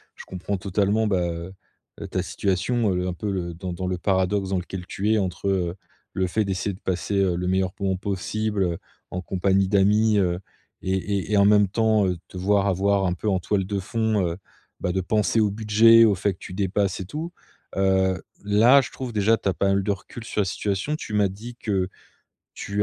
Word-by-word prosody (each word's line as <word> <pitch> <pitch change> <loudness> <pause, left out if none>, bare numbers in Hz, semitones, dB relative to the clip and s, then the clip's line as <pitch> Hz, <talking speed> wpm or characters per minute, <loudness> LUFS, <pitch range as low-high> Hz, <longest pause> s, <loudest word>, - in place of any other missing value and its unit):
je - - -11
comprends 95 +2 -4
totalement, 100 +3 +1
bah, 95 -3 +1
heu, 85 +3 -6 0.6
ta - - -1
situation. 100 +3 0
Heu, 90 0 -1
un 90 - -2
peu 105 +4 -4
le 85 -3 -3
dans 90 +1 -5
dans 90 +1 -4
le 90 -1 -1
paradoxe 95 +1 0
dans 95 - 0
lequel 90 0 -7
tu 105 +3 -1
es - - +3
entre, 95 0 -2
heu, 90 -2 0 0.4
le 95 - 0
fait 105 +3 0
d'essayer 95 +1 -2
de 95 - -12
passer, 95 +2 -2
heu, 95 -3 +2
le 90 +1 -2
meilleur 95 0 +1
moment 95 -1 0
possible, 100 +2 -2
heu, 85 -2 -1 0.3
en 90 - -3
compagnie 95 +1 +1
d'amis, 105 +2 +3
heu. 90 -1 +1 0.4
Et 95 - -1
et 100 +1 -2
et - - +4
en 100 - +5
même 105 -1 +5
temps 110 0 +2 0.2
te 90 - -10
voir 100 +2 +2
avoir 100 +1 +2
un 90 - 0
peu 105 - -5
en 95 -2 +1
toile 95 +1 0
de 100 0 -2
fond, 110 +1 0
heu, 85 +1 -4 0.4
bah, 90 - -1
de 95 +1 0
penser 105 +4 +1
au 105 -1 +3
budget 115 +2 +6
au 105 -3 +3
fait 100 +1 0
que - - -20
tu - - -9
dépasses 100 0 0
et 95 - -5
tout. 160 - -5 0.4
Heu, 95 -1 +2 0.2
là 115 +7 +6
je - - -7
trouve 130 -2 -6
déjà 110 +1 +3
tu 100 - -1
as - - +1
pas 100 - 0
mal 100 0 +2
de 105 - 0
recul 105 +4 -7
sur 105 - -1
la - - 0
situation. 100 +9 -2
Tu 110 - -7
m'as 100 -2 +3
dit 115 +5 -9
que 95 -6 -1 0.7
tu 100 +1 -2
100 Hz, 220 wpm, -24 LUFS, 95-105 Hz, 0.7 s, budget